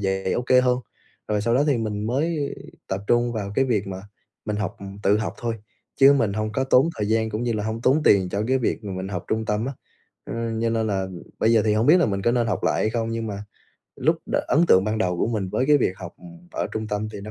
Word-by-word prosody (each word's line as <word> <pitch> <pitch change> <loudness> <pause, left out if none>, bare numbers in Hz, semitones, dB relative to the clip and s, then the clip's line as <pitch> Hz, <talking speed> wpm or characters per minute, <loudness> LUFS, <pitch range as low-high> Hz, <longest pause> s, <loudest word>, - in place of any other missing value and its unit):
dạy 95 -1 -1
ô 120 - 0
kê 125 +1 +4
hơn. 125 -1 +2 0.5
Rồi 105 -1 +1
sau 115 +2 +1
đó 135 +4 +3
thì 140 -5 +2
mình 105 -1 -3
mới 145 +4 -1 0.3
tập 95 0 -2
trung 120 0 +2
vào 100 -3 -4
cái 135 - +3
việc 110 -6 0
mà 95 -1 -6 0.4
mình 105 -1 -2
học 100 -2 -3 0.3
tự 105 +1 +3
học 110 - -3
thôi, 115 -1 -2 0.4
chứ 135 +1 +7
mình 115 -8 +1
hông 110 +1 -2
có 130 +5 0
tốn 130 +3 +4
thời 105 -1 -2
gian 110 0 +1
cũng 110 +2 -3
như 120 -1 0
là 105 -2 -2
hông 110 +1 -3
tốn 140 +5 +3
tiền 95 -2 +4
cho 100 +3 -2
cái 130 +1 +3
việc 115 -2 -2
mà 100 - -4
mình 95 +1 -4
học 90 -3 -4
trung 110 0 0
tâm 105 +2 -1
á. 135 - -3 0.5
Ừm, 115 -1 -3
cho 115 - +1
nên 115 -1 0
là 95 -2 -1 0.3
bây 115 - +3
giờ 110 -2 +4
thì 105 -1 +2
hông 110 +3 +1
biết 155 - +7
là 170 - +3
mình 100 -2 -2
có 120 - +2
nên 120 -1 +1
học 105 -5 -2
lại - - +1
hay 110 - +1
không, 115 0 -2
nhưng 115 0 -3
mà 100 -1 -5 0.5
lúc - - +2
đ - - -5
ấn 165 +4 +4
tượng 95 +1 +6
ban 110 +1 -1
đầu 90 -5 0
của - - +1
mình 105 -5 -2
với 130 +7 0
cái 150 0 +6
việc 115 - +1
học 90 -2 -9 0.4
ở - - -2
trung 110 0 -3
tâm 105 +1 -2
thì - - -7
nó 105 +2 -8
110 Hz, 275 wpm, -23 LUFS, 105-120 Hz, 0.5 s, chứ